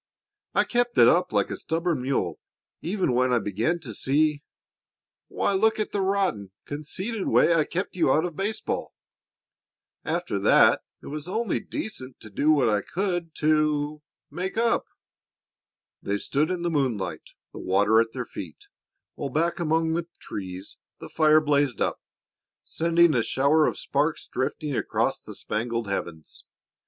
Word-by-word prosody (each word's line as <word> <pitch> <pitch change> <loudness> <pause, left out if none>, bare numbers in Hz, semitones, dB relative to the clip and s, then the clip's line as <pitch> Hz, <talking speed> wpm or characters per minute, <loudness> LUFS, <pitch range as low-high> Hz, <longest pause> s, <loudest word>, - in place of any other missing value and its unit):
"I - - +5
kept 240 0 0
it - - +8
up 180 +1 +3
like - - +1
a - - -2
stubborn 165 -3 -1
mule 125 - -1 0.4
even 185 -4 0
when 125 +1 +2
I 125 - +4
began 110 - 0
to 120 -8 -6
see 145 +5 +1 0.9
Why, - - 0
look 220 +3 +2
at 215 - -1
the 200 - -1
rotten, 190 - 0 0.2
conceited 185 +9 -4
way 170 - +4
I 160 -2 +3
kept 185 +4 -3
you 165 -7 +3
out 155 +5 +3
of 170 -3 -5
baseball. 210 +4 -3 1.1
After - - -2
that - - +5 0.2
it - - -10
was 150 +2 -5
only 220 +4 -1
decent 170 - -5
to 110 - -10
do 145 +9 +1
what 145 -5 +4
I 105 -2 +2
could 175 - -3
to 150 -1 +1 0.3
make 180 +7 -4
up." 230 0 +2 1.2
They 100 +1 -1
stood 145 +8 0
in 180 -2 -2
the 170 - 0
moonlight, 130 -10 -2 0.2
the - - -8
water 105 +4 +3
at 115 0 -2
their 125 -1 -4
feet, 85 -8 -9 0.4
while 140 - -4
back 165 +6 0
among 160 0 +1
the 170 0 -2
trees 95 -1 -7 0.2
the - - -9
fire 155 -1 +5
blazed 145 -6 +1
up, - - -1 0.6
sending 170 0 +3
a 120 - +3
shower 140 +6 +3
of - - -2
sparks 150 +3 -1
drifting 145 +2 -3
across - - 0
the - - -10
spangled 115 +1 -3
heavens. 85 -5 -5
155 Hz, 155 wpm, -26 LUFS, 125-175 Hz, 1.2 s, it